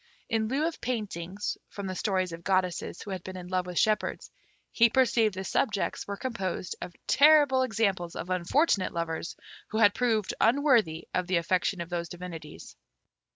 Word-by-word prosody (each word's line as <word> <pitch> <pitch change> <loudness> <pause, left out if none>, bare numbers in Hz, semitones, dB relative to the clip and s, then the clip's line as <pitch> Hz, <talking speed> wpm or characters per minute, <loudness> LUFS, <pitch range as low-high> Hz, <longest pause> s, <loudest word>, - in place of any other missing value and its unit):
In 225 -2 +1
lieu 275 +6 0
of 330 -1 -3
paintings 205 -5 -3
from 200 - -7
the 185 - -3
stories 185 -2 -1
of 165 0 -8
goddesses 185 -2 -1
who 205 - -7
had 185 -2 -5
been 185 0 -7
in 180 -1 -8
love 185 0 -1
with 180 -1 -6
shepherds, 215 -1 0 0.4
he 235 0 +5
perceived 230 -4 +3
the 190 - -4
subjects 200 0 -1
were 200 0 -4
composed 195 -7 -3
of 175 - -7
terrible 290 -3 +6
examples 200 -8 0
of 180 - -5
unfortunate 185 - +1
lovers 170 0 -3 0.3
who 215 - -4
had 205 -2 +6
proved 225 -5 0
unworthy 230 - +3
of 180 -1 0
the 185 -1 +2
affection 180 +2 0
of 170 - -6
those 170 -1 -3
divinities. 170 -4 -9
195 Hz, 170 wpm, -28 LUFS, 180-230 Hz, 0.4 s, terrible